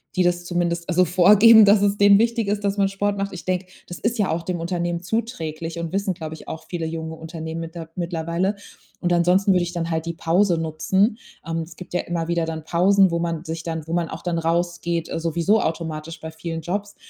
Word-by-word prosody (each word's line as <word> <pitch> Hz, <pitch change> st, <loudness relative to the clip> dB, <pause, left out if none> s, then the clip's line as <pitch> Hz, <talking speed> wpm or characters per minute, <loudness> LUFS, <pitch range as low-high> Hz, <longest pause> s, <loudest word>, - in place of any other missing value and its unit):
die 185 Hz, -, +3 dB
das 175 Hz, 0 st, +1 dB
zumindest 175 Hz, -1 st, -1 dB
also 180 Hz, +1 st, +4 dB
vorgeben, 205 Hz, +6 st, +7 dB
dass 205 Hz, 0 st, +5 dB
es 200 Hz, 0 st, +2 dB
denen 200 Hz, 0 st, +7 dB
wichtig 230 Hz, 0 st, +1 dB
ist, 205 Hz, 0 st, -1 dB
dass 200 Hz, 0 st, 0 dB
man 200 Hz, -1 st, +3 dB
Sport 200 Hz, +1 st, -1 dB
macht. 195 Hz, 0 st, -2 dB
Ich 180 Hz, -, -9 dB
denke, 185 Hz, 0 st, -1 dB, 0.2 s
das 175 Hz, -, -8 dB
ist 230 Hz, +2 st, -1 dB
ja 205 Hz, -3 st, +1 dB
auch 165 Hz, -, -1 dB
dem 175 Hz, +1 st, -3 dB
Unternehmen 175 Hz, 0 st, -2 dB
zuträglich 170 Hz, -6 st, -3 dB
und 170 Hz, -1 st, -4 dB
wissen, 195 Hz, -1 st, 0 dB
glaube 160 Hz, -2 st, -6 dB
ich, 160 Hz, -, -12 dB
auch 160 Hz, -, -7 dB
viele 170 Hz, -3 st, -3 dB
junge 160 Hz, 0 st, -5 dB
Unternehmen 160 Hz, 0 st, -6 dB
mitter 165 Hz, 0 st, -7 dB
mittlerweile. 170 Hz, +2 st, -1 dB, 0.5 s
Und 175 Hz, -1 st, +1 dB
ansonsten 180 Hz, +3 st, +3 dB
würde 180 Hz, -1 st, +3 dB
ich 175 Hz, 0 st, -5 dB
dann 170 Hz, -1 st, -3 dB
halt 160 Hz, 0 st, -2 dB
die 170 Hz, -, -2 dB
Pause 170 Hz, +2 st, +2 dB
nutzen. 190 Hz, +7 st, +1 dB, 0.3 s
Ähm, 165 Hz, 0 st, -2 dB
es 165 Hz, +1 st, -7 dB
gibt 180 Hz, -, -11 dB
ja 180 Hz, -, +1 dB
immer 170 Hz, -1 st, -3 dB
wieder 170 Hz, -1 st, 0 dB
dann 160 Hz, -1 st, -5 dB
Pausen, 185 Hz, +3 st, +4 dB
wo 170 Hz, -, 0 dB
man 170 Hz, -2 st, -2 dB
sich 165 Hz, -1 st, -5 dB
dann 160 Hz, -2 st, -4 dB
wo 165 Hz, -, -4 dB
man 170 Hz, -1 st, 0 dB
auch 160 Hz, -, -8 dB
dann 175 Hz, -2 st, -1 dB
rausgeht, 170 Hz, 0 st, -1 dB
äh, -, -, -2 dB
sowieso 170 Hz, +6 st, +1 dB
automatisch 160 Hz, 0 st, -4 dB
bei 160 Hz, -, -6 dB
vielen 165 Hz, 0 st, -5 dB
Jobs. 200 Hz, +5 st, -4 dB
170 Hz, 230 wpm, -22 LUFS, 165-195 Hz, 0.5 s, vorgeben